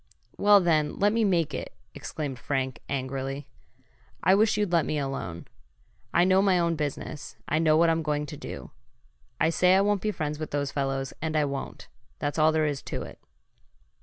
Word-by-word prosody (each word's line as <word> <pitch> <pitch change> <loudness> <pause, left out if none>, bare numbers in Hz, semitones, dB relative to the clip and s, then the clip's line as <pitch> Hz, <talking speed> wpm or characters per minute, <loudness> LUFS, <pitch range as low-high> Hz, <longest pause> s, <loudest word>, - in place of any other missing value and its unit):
"Well 205 0 +6
then, 155 -5 +1
let 205 +1 +3
me 230 0 +2
make 170 -7 +1
it!" - - -5 0.2
exclaimed 140 -5 -5
Frank, 130 -3 -2
angrily. 135 +1 -3 0.8
"I 185 - +5
wish 215 +2 +3
you'd 205 -4 0
let 170 -2 +4
me 150 - -2
alone! 135 - -4 0.7
I 175 - +4
know 185 +1 +4
my 195 -2 +3
own 170 -1 +1
business. 145 -4 -5
I 155 - +1
know 155 -1 +4
what 165 0 +5
I'm 165 0 +1
going 150 -1 -1
to - - -8
do. - - -8 0.7
I 160 - +3
say 180 +2 +4
I 195 - +5
won't 205 -1 +1
be 215 - 0
friends 150 -6 -3
with 155 - -4
those 140 -1 -2
fellows, 135 -1 -2
and 160 0 -2
I 150 - +3
won't. 140 -1 -5 0.3
That's 145 +2 -2
all 155 +1 +5
there 155 -1 +2
is 145 -2 -2
to - - -5
it." - - -11
155 Hz, 195 wpm, -27 LUFS, 140-175 Hz, 0.8 s, Well